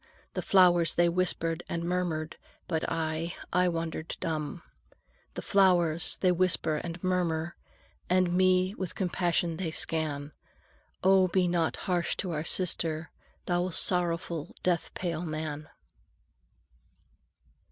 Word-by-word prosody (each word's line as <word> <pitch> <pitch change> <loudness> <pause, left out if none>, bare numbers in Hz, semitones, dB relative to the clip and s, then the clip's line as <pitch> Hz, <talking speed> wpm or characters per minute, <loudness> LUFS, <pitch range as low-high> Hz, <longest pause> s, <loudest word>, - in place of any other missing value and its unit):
The - - -2
flowers 175 -4 +4
they 175 0 +4
whispered 170 -2 0
and 170 0 -2
murmured, 170 -3 -2 0.3
But 160 -2 -1
I, 165 +1 -2 0.2
I 180 0 +3
wandered 165 -1 -3
dumb. 155 -3 -3 0.7
The - - -5
flowers 175 -4 +3
they 185 - +4
whisper 175 -3 +1
and 170 +2 -6
murmur, 175 -2 0 0.5
And 180 -1 +3
me 185 +1 +3
with 185 -5 -5
compassion 175 -3 0
they 180 -2 -2
scan: 150 -2 -2 0.7
"Oh, 190 0 +5
be 180 0 +2
not 170 -2 +1
harsh 180 -2 0
to 185 - -3
our 155 -1 -2
sister, 160 -2 -1 0.3
Thou 175 +1 0
sorrowful, 170 -2 +1
death 175 -2 0
pale 170 -3 -2
man!") 155 -2 -5
170 Hz, 120 wpm, -29 LUFS, 160-180 Hz, 0.7 s, Oh